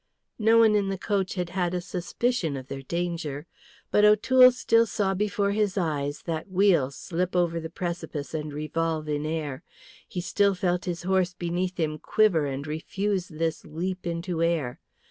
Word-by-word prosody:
No 225 Hz, +1 st, +5 dB
one 225 Hz, -2 st, +6 dB
in 200 Hz, -2 st, +2 dB
the 195 Hz, -, -2 dB
coach 195 Hz, -1 st, -1 dB
had 180 Hz, -2 st, -3 dB
had 180 Hz, -1 st, -1 dB
a -, -, 0 dB
suspicion 180 Hz, -, -2 dB
of 130 Hz, 0 st, -9 dB
their 135 Hz, 0 st, -5 dB
danger. 165 Hz, -1 st, -3 dB, 0.5 s
But 210 Hz, -, +4 dB
O'Toole 255 Hz, +5 st, +7 dB
still 230 Hz, -2 st, +3 dB
saw 195 Hz, -2 st, 0 dB
before 200 Hz, 0 st, 0 dB
his 205 Hz, -1 st, 0 dB
eyes 145 Hz, -5 st, -1 dB
that 165 Hz, +2 st, -4 dB
wheel 185 Hz, -8 st, +3 dB
slip 180 Hz, +6 st, -3 dB
over 170 Hz, -2 st, +2 dB
the 160 Hz, 0 st, -6 dB
precipice 170 Hz, -4 st, -5 dB
and 155 Hz, -1 st, -3 dB
revolve 155 Hz, +1 st, -2 dB
in 150 Hz, 0 st, -1 dB
air, 150 Hz, -4 st, -3 dB, 0.5 s
he 180 Hz, -, -5 dB
still 200 Hz, +2 st, +2 dB
felt 180 Hz, -1 st, 0 dB
his 175 Hz, -1 st, -3 dB
horse 185 Hz, -1 st, +1 dB
beneath 180 Hz, +1 st, -2 dB
him 155 Hz, -2 st, -1 dB
quiver 180 Hz, -9 st, +2 dB
and 135 Hz, +1 st, -4 dB
refuse 185 Hz, +5 st, -2 dB
this 160 Hz, 0 st, -2 dB
leap 180 Hz, +4 st, -4 dB
into 170 Hz, 0 st, -2 dB
air. 165 Hz, -7 st, 0 dB
175 Hz, 170 wpm, -26 LUFS, 155-195 Hz, 0.5 s, O'Toole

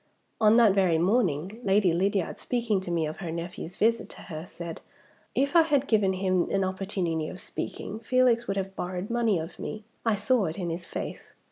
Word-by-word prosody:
On 215 Hz, +1 st, +6 dB
that 225 Hz, -5 st, +6 dB
very 185 Hz, -4 st, +3 dB
morning, 185 Hz, -, +1 dB
Lady 195 Hz, -3 st, +3 dB
Lydiard, 190 Hz, +1 st, 0 dB
speaking 230 Hz, -5 st, 0 dB
to 185 Hz, -, -6 dB
me 170 Hz, -2 st, +1 dB
of 155 Hz, +1 st, -5 dB
her 175 Hz, -4 st, -5 dB
nephew's 170 Hz, +1 st, -6 dB
visit 230 Hz, +2 st, +2 dB
to -, -, -11 dB
her, 160 Hz, 0 st, -7 dB
said, 170 Hz, -2 st, -7 dB, 0.5 s
'If 280 Hz, +5 st, +1 dB
I 335 Hz, -, +9 dB
had 285 Hz, -4 st, +2 dB
given 205 Hz, -4 st, +3 dB
him 185 Hz, -1 st, +1 dB
an 195 Hz, -1 st, +1 dB
opportunity 185 Hz, -4 st, -2 dB
of 185 Hz, -, -8 dB
speaking, 215 Hz, -, -5 dB
Felix 240 Hz, 0 st, +3 dB
would 195 Hz, -, -1 dB
have 195 Hz, 0 st, -3 dB
borrowed 185 Hz, +4 st, -4 dB
money 230 Hz, -5 st, +2 dB
of 165 Hz, +1 st, -6 dB
me; 215 Hz, 0 st, -5 dB, 0.2 s
I 225 Hz, -2 st, +2 dB
saw 215 Hz, +2 st, +2 dB
it 160 Hz, +2 st, -4 dB
in 175 Hz, -3 st, -2 dB
his 170 Hz, +1 st, -5 dB
face. -, -, -6 dB
195 Hz, 200 wpm, -27 LUFS, 175-225 Hz, 0.5 s, I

